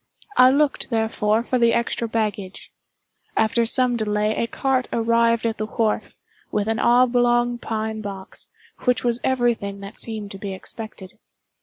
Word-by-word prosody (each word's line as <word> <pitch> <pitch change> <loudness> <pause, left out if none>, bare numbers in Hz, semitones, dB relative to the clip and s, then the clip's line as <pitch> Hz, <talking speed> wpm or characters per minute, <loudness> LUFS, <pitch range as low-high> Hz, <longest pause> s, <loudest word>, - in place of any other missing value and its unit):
I 255 0 +7
looked, 285 +1 +1
therefore, 220 -1 +1
for 255 +1 0
the 235 -1 +4
extra 235 0 -1
baggage. 210 -4 -3 0.7
After 230 +1 +2
some 250 0 +3
delay, 210 0 0
a 230 - -1
cart 260 +1 0
arrived 230 0 +2
at 225 -2 -1
the 215 - -2
wharf, 220 -1 -1 0.4
with 210 0 0
an 225 0 0
oblong 240 0 +3
pine 220 -1 -3
box, 195 -2 -7 0.4
which 250 -1 +2
was 240 0 +1
every 245 -2 +2
thing 200 -2 -7
that 200 +1 -9
seemed 215 -3 -6
to 195 - -8
be 195 -1 -5
expected. 210 -1 -9
230 Hz, 155 wpm, -22 LUFS, 215-240 Hz, 0.7 s, I